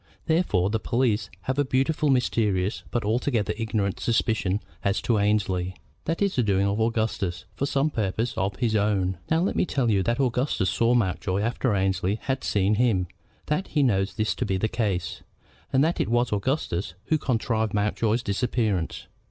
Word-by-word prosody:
Therefore 130 - +2
the 110 - 0
police 115 -2 0
have 130 +6 -2
a - - +4
beautifully 140 +3 +1
mysterious 105 -6 +1
but 120 -4 -1
altogether 110 -1 0
ignorant 105 -3 -1
suspicion 110 -4 +1 0.2
as 100 +1 +1
to 115 -3 +2
Annesley. 95 -3 0 0.3
That 165 +5 0
is 200 - 0
the 125 - +3
doing 100 -3 +2
of 100 +2 0
Augustus, 110 -5 -1
for 140 - -2
some 140 +2 +1
purpose 110 +2 -1
of 95 0 -1
his 115 0 0
own. 95 -4 +1
Now, 160 +1 +3
let 190 - 0
me - - +2
tell 125 -5 +1
you 100 -2 +3
that 120 +6 0
Augustus 125 -6 +1
saw 115 +1 +2
Mountjoy 95 -3 0
after 115 0 0
Annesley 95 0 +1
had 130 0 -2
seen 100 0 +2
him, 95 -8 +2 0.4
that 150 +6 -1
he 150 - +1
knows 95 -6 +1
this 110 -1 0
to - - -3
be 95 -5 0
the 110 - +1
case, 100 -7 -2 0.5
and 135 +1 +4
that 165 +2 +1
it - - -1
was 120 -1 +1
Augustus, 100 - -1
who 155 - +1
contrived 110 -4 0
Mountjoy's 110 +3 +1
disappearance. 105 -4 -1
110 Hz, 175 wpm, -25 LUFS, 100-125 Hz, 0.5 s, a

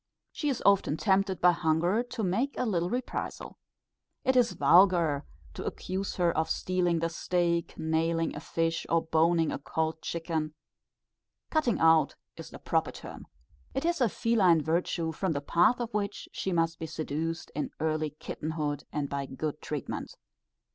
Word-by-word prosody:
She 295 - -2
is 265 - -2
often 195 -6 +4
tempted 190 -2 +1
by 180 - +7
hunger 170 +5 +1
to 245 -2 -5
make 230 +10 0
a - - 0
little 175 -6 0
reprisal. 245 +3 -4 0.6
It 260 0 +2
is 245 -2 +4
vulgar 170 -6 +4 0.3
to - - -6
accuse 190 +2 -3
her 175 -2 +2
of 160 0 0
stealing 180 -1 +1
the 165 +1 0
steak, 170 0 -1
nailing 165 +1 0
a - - -4
fish, 165 +1 -1
or 165 0 +2
boning 165 0 +2
a - - -3
cold 160 +2 -2
chicken, 160 -2 -3 1.0
"cutting 305 -8 +2
out," 160 -2 +4 0.2
is - - -9
the - - -10
proper - - 0
term. - - -10 0.5
It 270 - -1
is 340 -4 +1
a 240 - +4
feline 185 -6 +3
virtue, 165 0 0
from 165 +2 -1
the 140 - -1
path 175 +11 +3
of 240 -1 -4
which 205 -1 -2
she 190 - -3
must 165 -1 +1
be 160 - -4
seduced 160 +1 -3
in 150 - -2
early 155 -1 0
kitten 150 +1 -6
hood, 145 -3 -2
and 145 -1 -2
by 140 0 -3
good 150 +3 -4
treatment. 150 -3 -5
165 Hz, 165 wpm, -29 LUFS, 160-195 Hz, 1.0 s, by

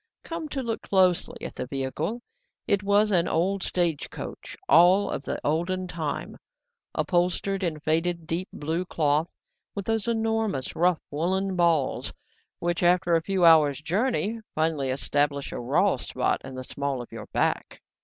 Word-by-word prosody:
COME 330 -2 -5
to 270 -2 -3
look 230 -2 -3
closely 185 -3 +1
at - - -6
the - - -5
vehicle, 145 - -3 0.4
it 200 - +2
was 205 +1 +3
an 175 -2 +3
old 190 +4 0
stage 170 -5 0
coach - - -8
all 185 - +6
of - - -3
the - - -3
olden 180 +5 0
time, 160 -4 -4 0.6
upholstered 180 +2 0
in 165 -4 -1
faded 165 +2 0
deep 170 +4 -2
blue 160 +4 -2
cloth, 155 -1 0 0.4
with 200 -2 -4
those 225 0 0
enormous 225 - -1
rough 175 0 +2
woollen 190 +5 0
balls 170 -6 +1 0.5
which, 175 0 -1
after 175 -1 +3
a 165 - +4
few 185 +1 +1
hours' 150 -4 +6
journey, 220 - 0 0.2
finally 155 -4 0
establish 140 +1 0
a - - -5
raw 120 - +2
spot - - -1
in 130 0 -8
the 130 - -5
small 140 0 -3
of - - -16
your - - -8
back. - - -1
175 Hz, 155 wpm, -26 LUFS, 155-195 Hz, 0.6 s, all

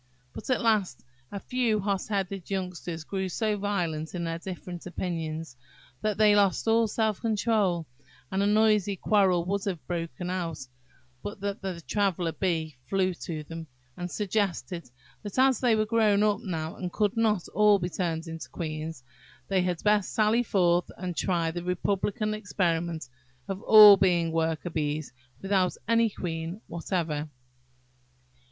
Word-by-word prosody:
But, - - -8
at 255 - +1
last, 210 - +1 0.3
a 200 - -4
few 235 -2 0
hot 200 -1 -1
headed 195 -3 -3
youngsters 180 -4 -4
grew 190 +2 -3
so 215 +4 0
violent 180 -6 -2
in 175 - -2
their 165 0 -3
different 180 -1 -7
opinions, 165 -5 -4 0.5
that 215 -2 0
they 210 -1 +5
lost 200 +1 +2
all 225 0 +4
self 215 -1 0
control, 210 -6 +1 0.5
and 190 +1 0
a 200 - +2
noisy 210 -2 +3
quarrel 185 -3 +2
would 200 +2 -1
have 185 -6 -3
broken 170 0 -4
out, 170 -4 -3 0.6
but 205 +6 -6
that 200 0 -3
the 185 -3 -4
Traveller 185 -3 0
bee 160 -5 -2
flew 190 -1 +1
to 160 -2 -6
them, 165 +1 -8 0.3
and 180 0 -5
suggested 190 - -2 0.3
that, 205 +1 -7
as 260 -2 +4
they 240 -3 +3
were 215 0 +1
grown 215 -2 +3
up 210 -1 +2
now, 160 -3 -4
and 180 -1 -4
could 210 0 0
not 215 -5 +1
all 210 0 +5
be 175 -2 -2
turned 165 -1 -2
into 165 -1 -7
queens, 155 -4 -5 0.5
they 190 -2 +2
had 180 -2 -2
best 210 -2 +2
sally 220 +1 +3
forth 175 -6 +2
and 180 -1 -4
try 170 -3 0
the 175 +1 -4
republican 200 +3 -1
experiment 170 -6 -1 0.4
of 195 0 -4
all 210 -3 +10
being 175 -3 +2
working 165 +1 -1
bees 150 -2 -2 0.3
without 190 -2 +1
any 230 0 +4
queen 170 -1 -5
whatever. 165 -3 -3
185 Hz, 155 wpm, -28 LUFS, 170-210 Hz, 0.6 s, all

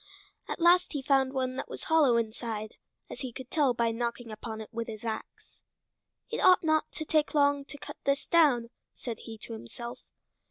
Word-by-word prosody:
At - - -4
last 345 +1 +5
he 285 -2 -3
found 270 -1 +3
one 260 -1 -2
that - - -4
was - - -7
hollow 300 -7 +4
inside, 220 -1 -3 0.3
as - - -8
he 260 -3 -4
could 255 +2 -9
tell 280 -6 +3
by 230 -1 +2
knocking 235 0 -3
upon 220 +1 -6
it 220 +1 -9
with 230 0 -3
his 220 0 -7
ax. 220 -1 -6 0.7
"It - - -2
ought 365 -1 +6
not 315 -1 +2
to 315 - -5
take 310 0 +1
long 285 -1 +3
to 285 +1 -10
cut - - -9
this 280 0 +1
down," 265 -9 +4 0.2
said 230 -3 -6
he 225 -1 -9
to 230 - -8
himself. 235 - -7
255 Hz, 195 wpm, -29 LUFS, 230-285 Hz, 0.7 s, ought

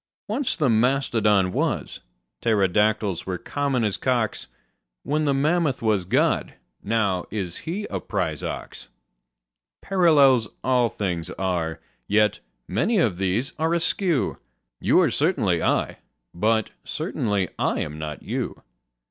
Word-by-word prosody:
Once 245 +5 -1
the 150 - +2
mastodon 110 -5 +2
was: - - -2 0.4
pterodactyls 105 -2 +1
were 90 -1 -2
common 140 +2 -1
as 105 -3 0
cocks: 120 -4 -1 0.6
Then 155 +1 0
the 140 - +2
mammoth 150 -2 +1
was 105 -5 +1
God: 90 - +1 0.3
now 100 -4 0
is 95 -5 -4
He 200 +5 -2
a 95 - -3
prize - - -2
ox. - - -6 0.9
Parallels 145 - +4 0.2
all 125 -2 +3
things 90 -6 -3
are: 90 -4 -2 0.3
yet 105 +1 +3 0.3
many 185 - +1
of 110 - +2
these 95 +7 -1
are 160 +2 +2
askew: 170 -2 0 0.4
You - - +4
are - - +2
certainly - - +1
I: - - 0 0.3
but 110 +4 +1
certainly 100 -5 -1
I - - +1
am 75 0 -5
not 75 -1 -6
you. - - -4
110 Hz, 125 wpm, -24 LUFS, 95-140 Hz, 0.9 s, Parallels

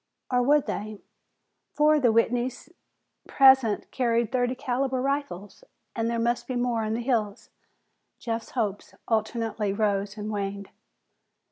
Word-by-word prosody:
Or 250 0 +3
would 290 +3 +3
they? 210 0 -5 0.8
Four 300 +1 +4
of - - -1
the 245 -3 +4
Whitneys 240 +4 0 0.6
present 265 -6 +4
carried 235 -3 0
thirty 250 -1 0
caliber 260 +1 -1
rifles 275 - -3 0.3
and 230 0 -1
there 235 - -1
must 240 +1 -1
be 255 - -3
more 245 -2 0
in 215 +1 -1
the 235 - -2
hills. 225 -4 -2 0.7
Jeff's 230 -1 -4
hopes 205 -4 -2
alternately 220 -2 -1
rose 200 0 -1
and 210 0 -4
waned. 200 -1 -4
235 Hz, 135 wpm, -26 LUFS, 215-255 Hz, 0.8 s, Four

